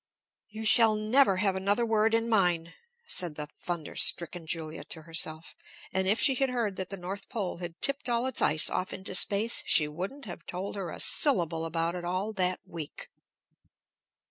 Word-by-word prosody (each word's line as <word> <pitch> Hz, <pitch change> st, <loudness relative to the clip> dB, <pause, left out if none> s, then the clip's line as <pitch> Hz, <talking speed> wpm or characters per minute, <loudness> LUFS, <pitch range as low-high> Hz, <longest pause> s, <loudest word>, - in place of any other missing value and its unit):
"You 220 Hz, +1 st, -8 dB
shall 220 Hz, 0 st, +5 dB
never 215 Hz, -1 st, +2 dB
have 195 Hz, 0 st, +1 dB
another 200 Hz, +5 st, +1 dB
word 220 Hz, 0 st, +2 dB
in 230 Hz, 0 st, 0 dB
mine!" 175 Hz, -6 st, +1 dB, 0.3 s
said 175 Hz, -, -3 dB
the 150 Hz, -1 st, -6 dB
thunderstricken 170 Hz, 0 st, +2 dB
Julia 160 Hz, -1 st, -4 dB
to 160 Hz, -, -3 dB
herself. 160 Hz, 0 st, -2 dB, 0.4 s
And 190 Hz, 0 st, 0 dB
if 210 Hz, +4 st, +2 dB
she 270 Hz, -, +5 dB
had 270 Hz, +1 st, 0 dB
heard 235 Hz, -6 st, -2 dB
that 190 Hz, -1 st, -3 dB
the 195 Hz, -, -6 dB
North 190 Hz, +3 st, -7 dB
Pole 200 Hz, -8 st, -4 dB
had 175 Hz, -1 st, -8 dB
tipped 275 Hz, -1 st, +2 dB
all 235 Hz, +1 st, 0 dB
its 260 Hz, -, 0 dB
ice 155 Hz, +1 st, +4 dB
off 185 Hz, -, -2 dB
into 190 Hz, 0 st, -5 dB
space, 205 Hz, +4 st, +3 dB
she 150 Hz, -, +6 dB
wouldn't 190 Hz, -, -7 dB
have 175 Hz, -4 st, -9 dB
told 185 Hz, +3 st, -4 dB
her 190 Hz, -4 st, -5 dB
a -, -, -9 dB
syllable 170 Hz, -, +2 dB
about 165 Hz, +1 st, -2 dB
it 175 Hz, -1 st, -5 dB
all 185 Hz, +5 st, -3 dB
that 185 Hz, -2 st, 0 dB
week. 160 Hz, -3 st, -9 dB
190 Hz, 180 wpm, -28 LUFS, 170-220 Hz, 0.4 s, she